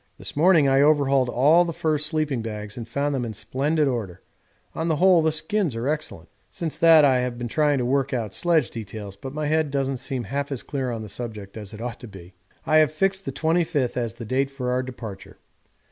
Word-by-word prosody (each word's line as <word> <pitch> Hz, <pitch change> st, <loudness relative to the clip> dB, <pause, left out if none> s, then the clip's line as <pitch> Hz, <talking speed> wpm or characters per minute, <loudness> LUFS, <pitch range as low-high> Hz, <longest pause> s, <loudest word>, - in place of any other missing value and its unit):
This -, -, -7 dB
morning 160 Hz, -1 st, +5 dB
I 135 Hz, 0 st, +4 dB
overhauled 140 Hz, -3 st, +3 dB
all 150 Hz, +8 st, +5 dB
the 170 Hz, -, -3 dB
fur 155 Hz, -1 st, 0 dB
sleeping 150 Hz, -4 st, -1 dB
bags 105 Hz, -2 st, -6 dB
and 115 Hz, -2 st, -7 dB
found 140 Hz, +4 st, -1 dB
them 130 Hz, -3 st, -1 dB
in 115 Hz, -2 st, -4 dB
splendid 140 Hz, +8 st, 0 dB
order 105 Hz, -8 st, -4 dB, 0.5 s
on 160 Hz, -, -2 dB
the 160 Hz, -, +2 dB
whole 180 Hz, +1 st, +5 dB
the 160 Hz, 0 st, +2 dB
skins 160 Hz, -, -1 dB
are 115 Hz, +3 st, -3 dB
excellent. 155 Hz, +1 st, -3 dB, 0.2 s
Since 165 Hz, -3 st, -5 dB
that 160 Hz, -3 st, +7 dB
I 130 Hz, -2 st, +4 dB
have 125 Hz, -1 st, -2 dB
been 120 Hz, 0 st, -4 dB
trying 150 Hz, +3 st, +2 dB
to 125 Hz, -, -1 dB
work 135 Hz, +1 st, +1 dB
out 115 Hz, -6 st, -3 dB
sledge 165 Hz, -, +1 dB
details, 105 Hz, -3 st, -7 dB
but 130 Hz, +7 st, -8 dB
my 150 Hz, +2 st, -3 dB
head 155 Hz, 0 st, +1 dB
doesn't 135 Hz, -1 st, -1 dB
seem 130 Hz, -1 st, -4 dB
half 140 Hz, +3 st, -3 dB
as 135 Hz, -, -3 dB
clear 135 Hz, -3 st, -3 dB
on 115 Hz, -2 st, -4 dB
the -, -, -7 dB
subject 105 Hz, -2 st, -7 dB
as 105 Hz, -3 st, -8 dB
it 110 Hz, -, -9 dB
ought 120 Hz, 0 st, -5 dB
to 120 Hz, -, -10 dB
be. 95 Hz, -3 st, -13 dB, 0.3 s
I 155 Hz, -, +4 dB
have 155 Hz, -2 st, +4 dB
fixed 190 Hz, +4 st, 0 dB
the -, -, -3 dB
25th 160 Hz, -5 st, 0 dB
as 115 Hz, -2 st, -2 dB
the 120 Hz, -1 st, -8 dB
date 135 Hz, +4 st, 0 dB
for 130 Hz, -2 st, -3 dB
our 125 Hz, +1 st, +1 dB
departure. 120 Hz, -6 st, -9 dB
135 Hz, 225 wpm, -24 LUFS, 115-155 Hz, 0.5 s, that